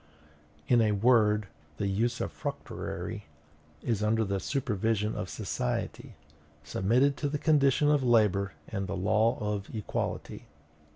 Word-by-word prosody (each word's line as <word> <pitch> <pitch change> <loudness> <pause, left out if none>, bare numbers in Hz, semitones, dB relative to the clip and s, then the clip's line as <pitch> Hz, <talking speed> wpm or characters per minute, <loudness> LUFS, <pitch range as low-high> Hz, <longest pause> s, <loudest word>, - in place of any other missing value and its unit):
In 120 -2 +5
a 105 -2 +3
word, 105 -1 +4 0.3
the 100 - -1
usufructuary 115 +5 -3 0.6
is 115 -4 0
under 110 +1 +2
the 100 -2 -1
supervision 110 -3 -1
of 90 - -4
society, 60 - -3 0.5
submitted 120 - +2
to 145 - -1
the 150 - -1
condition 145 -2 +3
of 145 -2 +3
labor 105 -6 +3
and 100 -3 -3
the 100 - -3
law 110 +5 +2
of 105 -2 -3
equality. 105 - -4
110 Hz, 120 wpm, -29 LUFS, 100-120 Hz, 0.6 s, In